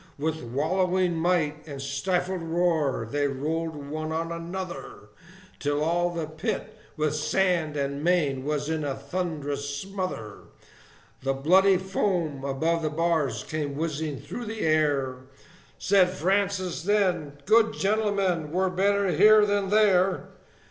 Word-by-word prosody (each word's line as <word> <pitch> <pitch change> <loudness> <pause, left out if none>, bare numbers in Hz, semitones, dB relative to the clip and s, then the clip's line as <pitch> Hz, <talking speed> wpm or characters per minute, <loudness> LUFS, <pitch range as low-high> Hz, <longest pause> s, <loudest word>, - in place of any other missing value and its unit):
With 160 +2 -2
wallowing 180 +8 0
might 160 -3 0
and 140 -2 -7
stifled 180 +7 -1
roar, 165 -7 0
they 145 +4 0
rolled 155 +4 -2
one 155 +2 -5
on 165 +1 -2
another, 170 - -6 0.5
Till 145 +1 0
all 175 +2 +1
the 170 -2 -3
pit, 175 +7 -4 0.2
with 155 -1 +1
sand 155 0 +1
and 140 +1 -2
mane, 150 -7 +1
was 145 0 -2
in 160 -1 -1
a 140 -2 -2
thunderous 145 -3 -3
smother; 185 - -5 0.8
The 135 0 0
bloody 185 +8 +4
foam 180 -6 -1
above 160 +5 0
the 155 - 0
bars 160 -2 0
came 150 -3 -3
whizzing 155 -1 -2
through 150 +12 -7
the 220 0 -5
air; 145 -5 +1 0.6
Said 190 -2 +4
Francis, 190 0 0
then, 180 -6 +1
"Good 225 +3 +4
gentlemen, 195 -6 0
we're 185 +2 +1
better 200 +1 +2
here 215 +3 +6
than 205 -1 0
there!" 195 -3 +3
165 Hz, 130 wpm, -26 LUFS, 145-185 Hz, 0.8 s, here